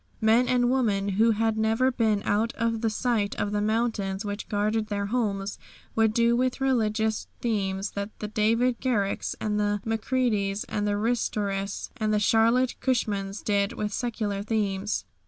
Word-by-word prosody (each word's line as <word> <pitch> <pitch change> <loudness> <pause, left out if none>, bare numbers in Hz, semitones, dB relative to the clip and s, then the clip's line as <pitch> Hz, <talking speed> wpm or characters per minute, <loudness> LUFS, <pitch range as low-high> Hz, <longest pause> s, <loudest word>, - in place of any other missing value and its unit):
Men 225 +3 +4
and 245 -1 +2
women 205 -6 +1
who 215 +4 +3
had 220 0 +1
never 225 +4 +2
been 220 -4 +1
out 220 +3 +1
of 230 -1 -1
the 225 - +1
sight 215 -2 0
of 205 - -2
the 205 0 0
mountains 215 -2 -1
which 205 0 -5
guarded 215 +1 0
their 200 -1 -2
homes 205 -3 -2 0.4
would 225 -1 +3
do 235 +1 +3
with 255 +2 0
religious 220 -4 0
themes 195 -4 -1
what 200 +1 -3
the 210 - -4
David 230 +3 +1
Garricks 210 -7 0
and 210 -1 -1
the 205 0 +1
Macreadys 220 -3 0
and 210 0 -2
the 205 0 +1
Ristoris 205 -3 -1
and 215 -3 0
the 210 - +2
Charlotte 230 +4 +3
Cushmans 205 -6 -1
did 200 -1 +1
with 210 -1 -3
secular 215 -4 -2
themes. 205 -1 -1
215 Hz, 160 wpm, -26 LUFS, 205-230 Hz, 0.4 s, Men